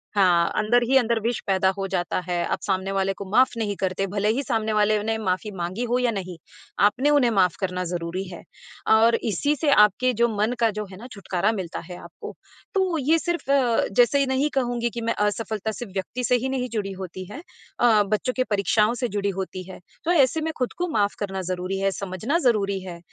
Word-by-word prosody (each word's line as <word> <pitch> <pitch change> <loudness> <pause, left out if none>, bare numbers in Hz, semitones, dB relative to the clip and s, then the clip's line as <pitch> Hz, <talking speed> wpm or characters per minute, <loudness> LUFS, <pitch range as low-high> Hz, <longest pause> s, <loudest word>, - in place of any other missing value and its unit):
हाँ, 175 -4 +4
अंदर 230 +3 +3
ही 270 - +3
अंदर 235 -2 +2
विष 235 +2 -1
पैदा 190 -1 +3
हो 195 - -2
जाता 185 -2 -1
है, 175 -1 0
आप - - -1
सामने 190 0 -1
वाले 195 0 0
को 200 - -8
माफ़ 255 +5 +5
नहीं 210 -3 -1
करते, 190 +1 -1
भले 205 +2 0
ही 275 +4 -1
सामने 220 -4 -1
वाले 210 0 +3
ने 220 +1 -1
माफ़ी 190 -1 -2
माँगी 180 +6 -3
हो 245 - +2
या 250 -2 +1
नहीं, 185 -4 -5 0.5
आपने 255 +7 +2
उन्हें 285 -5 +4
माफ़ 185 -5 +2
करना 185 -1 -2
ज़रूरी 175 +1 -3
है। 175 -2 -9 0.5
और 225 +1 +5
इसी 285 +8 0
से 300 +1 0
आपके 210 +2 +4
जो 235 +1 +2
मन 215 +4 +1
का 230 -1 +3
जो 210 - -2
है 185 - -10
ना 235 +5 -10
छुटकारा 195 0 -1
मिलता 190 -6 -4
है 180 - -7
आपको। - - -10 0.4
तो 375 -4 +1
ये 310 +3 +3
सिर्फ़ 345 -4 -2
अ, 250 -5 +3
जैसे 250 +6 +4
नहीं 265 +3 +1
कहूँगी 245 -3 0
कि 235 0 -6
मैं 230 0 0
असफलता 220 0 -2
सिर्फ़ 220 -1 -8
व्यक्ति 200 +6 -4
से 250 - +3
ही 260 +2 -2
नहीं 255 -1 -2
जुड़ी 210 -4 -3
होती 185 -1 -7
है 280 - -7 0.4
अ, 220 -4 +5
बच्चों 215 +5 -1
की 255 - +3
परीक्षाओं 210 +2 +2
से - - +2
जुड़ी 200 -1 -1
होती 185 -1 -4
है। 185 - -9 0.3
तो 340 - +2
ऐसे 315 -1 +3
में 320 +1 -1
खुद 250 -2 -2
को 355 - -1
माफ़ 205 -7 +1
करना 195 -2 -3
ज़रूरी 185 +1 -3
है, 195 0 +1
समझना 195 - -2
ज़रूरी 200 -4 +1
है 175 -2 -8
210 Hz, 220 wpm, -24 LUFS, 190-245 Hz, 0.5 s, माफ़